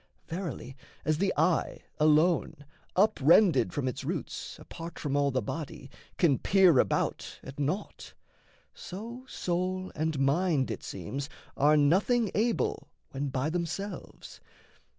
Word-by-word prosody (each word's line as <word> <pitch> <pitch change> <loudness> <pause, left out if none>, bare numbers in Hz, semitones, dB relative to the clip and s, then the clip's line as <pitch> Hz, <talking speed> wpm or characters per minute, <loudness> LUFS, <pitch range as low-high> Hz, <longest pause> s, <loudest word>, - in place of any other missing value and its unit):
Verily, 165 -7 -5 0.3
as 155 -1 +1
the 195 -1 +2
eye, 160 +2 +1 0.2
Alone, 155 -1 +3 0.3
up 205 +4 +3
rended 165 +1 +5
from 140 -3 -2
its 125 - -3
roots, - - -4
apart 165 0 -9
From 145 -2 -2
all 145 0 +3
the 130 -3 -1
body, 140 +1 -6 0.3
can 150 -7 +3
peer 185 -8 +5
about - - 0
at 135 +2 -9
naught, 150 +9 -3 0.6
So 235 +7 -8
soul 185 -2 -2
and 155 -1 -1
mind 140 +1 +2
it - - -5
seems 135 - -5 0.3
are 150 +2 +4
nothing 195 - +3
able, 220 -9 0 0.2
When 140 +1 -3
by 135 +4 -1
themselves. 175 +4 -5
160 Hz, 130 wpm, -29 LUFS, 140-185 Hz, 0.6 s, rended